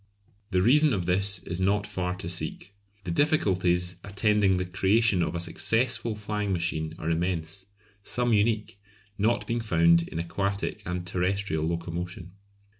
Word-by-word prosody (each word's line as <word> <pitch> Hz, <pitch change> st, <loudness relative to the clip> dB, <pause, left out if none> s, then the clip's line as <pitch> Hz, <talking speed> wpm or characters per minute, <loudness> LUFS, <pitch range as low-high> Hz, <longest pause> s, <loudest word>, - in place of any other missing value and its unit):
The 90 Hz, 0 st, +2 dB
reason 150 Hz, +5 st, +5 dB
of 95 Hz, -5 st, -1 dB
this 95 Hz, +1 st, +1 dB
is 85 Hz, 0 st, -4 dB
not 100 Hz, +2 st, +1 dB
far 90 Hz, -3 st, -3 dB
to 90 Hz, -, -7 dB
seek. 90 Hz, +3 st, -4 dB, 0.3 s
The 90 Hz, -, -4 dB
difficulties 90 Hz, -, +1 dB
attending 100 Hz, -1 st, +2 dB
the 90 Hz, -, -1 dB
creation 95 Hz, +2 st, +2 dB
of 85 Hz, -, -1 dB
a -, -, -1 dB
successful 115 Hz, +6 st, +1 dB
flying 105 Hz, -1 st, -3 dB
machine 85 Hz, -3 st, -2 dB
are 80 Hz, -, -2 dB
immense, 85 Hz, +2 st, -2 dB, 0.3 s
some 120 Hz, +3 st, 0 dB
unique, 105 Hz, -1 st, +1 dB, 0.4 s
not 115 Hz, +4 st, +1 dB
being 115 Hz, 0 st, -1 dB
found 85 Hz, -5 st, +3 dB
in -, -, -7 dB
aquatic 100 Hz, +4 st, -2 dB
and 90 Hz, 0 st, -3 dB
terrestrial 90 Hz, -2 st, -1 dB
locomotion. 85 Hz, +1 st, -4 dB
95 Hz, 145 wpm, -27 LUFS, 85-105 Hz, 0.4 s, reason